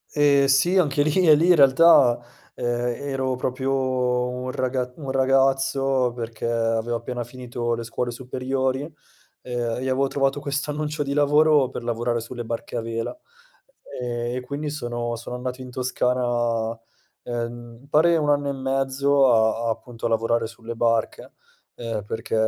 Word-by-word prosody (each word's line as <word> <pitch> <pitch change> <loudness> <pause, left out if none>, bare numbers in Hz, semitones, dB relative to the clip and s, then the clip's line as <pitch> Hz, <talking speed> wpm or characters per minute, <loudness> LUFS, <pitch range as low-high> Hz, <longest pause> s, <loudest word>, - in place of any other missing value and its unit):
Ehm, 145 -2 +4
sì, 140 +7 +3
anche 145 -5 +2
lì 155 +5 +2
e 155 - +9
lì 160 +4 +3
in 180 - +7
realtà, 140 -3 +6 0.3
ehm, - - -8 0.4
ero 135 -2 -2
proprio 130 +1 -2 0.6
un 125 +1 -4
raga 125 -1 -2
un 140 -4 -7
ragazzo 135 -1 +2
perché 115 -2 -5
avevo 115 0 0
appena 120 +1 -5
finito 120 -1 -4
le 115 - -3
scuole 120 +1 -3
superiori, 130 +2 -2
uhm, 155 - -9 0.5
e 125 -1 -4 0.3
avevo 135 +1 +2
trovato 135 +1 0
questo 145 +1 -2
annuncio 150 0 -2
di 140 -1 -3
lavoro 150 -1 +4
per - - -7
lavorare 120 0 -1
sulle 120 +1 -6
barche 115 +1 -5
a - - 0
vela, 115 - -4 0.9
ehm, 120 0 -3
e - - -2
quindi 140 +4 -5
sono 120 -4 -3
sono 120 +2 -6
andato 125 +1 -5
in 130 - -8
Toscana, 120 -2 0 0.5
ehm, 120 0 -5
m 140 - -18
pare 170 +3 +4
1 150 -2 +1
anno 145 -1 +1
e - - 0
mezzo 135 +1 +2
a 115 0 +2
appunto 115 +1 -5
a - - +2
lavorare 115 0 +1
sulle 115 +1 -8
barche, 115 -1 -1 0.4
ehm, 115 -3 -4
perché 115 +2 -4
125 Hz, 155 wpm, -23 LUFS, 120-140 Hz, 0.9 s, e